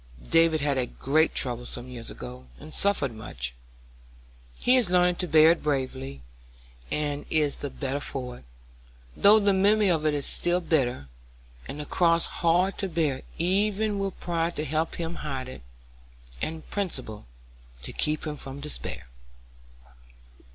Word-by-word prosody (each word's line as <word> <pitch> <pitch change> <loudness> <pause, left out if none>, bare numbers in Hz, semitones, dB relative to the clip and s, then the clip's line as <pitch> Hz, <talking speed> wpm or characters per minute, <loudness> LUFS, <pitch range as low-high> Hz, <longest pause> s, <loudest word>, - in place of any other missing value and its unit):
David 165 -2 +5
had 140 -2 +1
a 125 - 0
great 155 +7 +1
trouble 125 -2 -1
some 120 +1 -5
years 120 -2 -7
ago 65 +1 -9
and 155 - -11
suffered 175 -11 +1
much. 60 - -5 1.0
He 250 - +4
is 245 -8 +3
learning 180 -1 +3
to 180 - -1
bear 160 0 +7
it 170 - 0
bravely, 135 - -2 0.7
and 145 -1 -2
is 150 -2 +2
the 145 - -4
better 135 0 -3
for 125 -3 -5
it, - - -20 0.7
though 210 +2 +7
the 200 -1 +3
memory 205 +2 +4
of 160 -3 +1
it 150 - +2
is 145 - -2
still 175 +1 +1
bitter, 130 - 0 0.6
and 145 - -6
the 150 - -4
cross 170 +1 +3
hard 175 +3 +1
to 195 - -1
bear 155 -6 0 0.2
even 205 +4 +1
with 195 -1 -3
pride 170 -1 -1
to 150 - -2
help 155 +3 -1
him 170 0 -4
hide 135 -3 -4
it, 130 - -9 0.8
and 160 0 -4
principle 130 - -4 0.6
to - - -6
keep 155 +1 0
him 150 -1 -4
from 135 0 -7
despair." 150 +1 -6
155 Hz, 155 wpm, -27 LUFS, 135-175 Hz, 1.0 s, bear